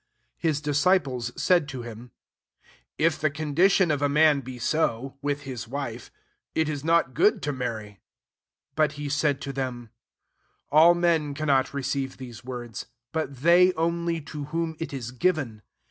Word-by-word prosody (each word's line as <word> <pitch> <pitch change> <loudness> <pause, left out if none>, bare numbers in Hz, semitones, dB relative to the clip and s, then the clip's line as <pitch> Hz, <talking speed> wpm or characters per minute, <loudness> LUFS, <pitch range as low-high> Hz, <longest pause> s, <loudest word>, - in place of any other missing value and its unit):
10 165 - +2
His 150 -2 -1
disciples 145 -5 +1
said 175 -5 +3
to 130 -3 -6
him, 120 +1 -9 0.5
^^ - - -31 0.3
If 160 0 +2
the 155 - +3
condition 155 +5 +2
of 145 -2 0
a 145 - +2
man 150 0 +5
be 130 -1 -8
so, 130 -1 -1
with 145 0 -1
hia 130 -2 -6
wife, 125 -3 -5 0.5
it 160 -1 +2
is 145 -2 -3
not 165 -4 +2
good 215 - +3
to 145 - -1
mur* 125 -3 -2
ry.'* 110 - -7
11 105 -1 -15 0.8
But 155 0 +2
he 145 -1 -5
said 145 -1 +1
to 140 -2 -5
them, 125 -4 -4 0.4
^< - - -50 0.3
All 165 +3 +7
men 165 -4 +1
cannot 140 -3 +1
receive 135 -1 -2
these 120 -4 -10
words; 120 -4 -6 0.2
but 140 -5 -4
they 180 +2 +6
only 170 0 -1
to 150 0 -7
whom 165 +2 -2
it 165 - -4
is 125 -4 -5
given. 130 -6 0
145 Hz, 175 wpm, -26 LUFS, 130-160 Hz, 0.8 s, All